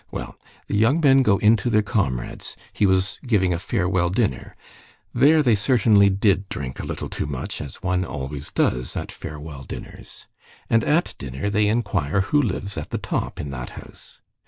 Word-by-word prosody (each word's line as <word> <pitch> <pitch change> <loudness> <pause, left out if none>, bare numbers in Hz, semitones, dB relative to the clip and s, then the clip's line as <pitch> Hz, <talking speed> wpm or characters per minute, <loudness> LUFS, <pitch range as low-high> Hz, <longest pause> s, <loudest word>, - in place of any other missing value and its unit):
Well, - - -6 0.3
the - - -3
young 115 +9 +3
men 135 -4 +5
go 105 -6 +3
in 105 +3 +5
to 105 +4 -2
their 110 -2 +3
comrade's; 80 - -2 0.2
he 105 - +2
was 95 +1 +1
giving 95 -6 +2
a 85 - -2
farewell 90 -3 0
dinner. 95 - -1 0.6
There 155 +2 +5
they 120 -4 +4
certainly 105 -2 +4
did 100 0 +1
drink 65 -3 -5
a - - -4
little - - -4
too - - -4
much, 70 -3 -5
as 70 -3 -9
one 90 0 +1
always 70 -2 -6
does 60 0 -1
at - - -4
farewell 75 -2 -8
dinners. 65 - -10 0.5
And 115 0 +4
at 160 +4 +1
dinner 70 +9 -4
they 105 0 +2
inquire 100 -6 0
who 145 +10 +2
lives 100 - -3
at 75 - -7
the - - -2
top - - -3
in 75 - -4
that - - -6
house. - - -14
100 Hz, 180 wpm, -23 LUFS, 75-110 Hz, 0.6 s, men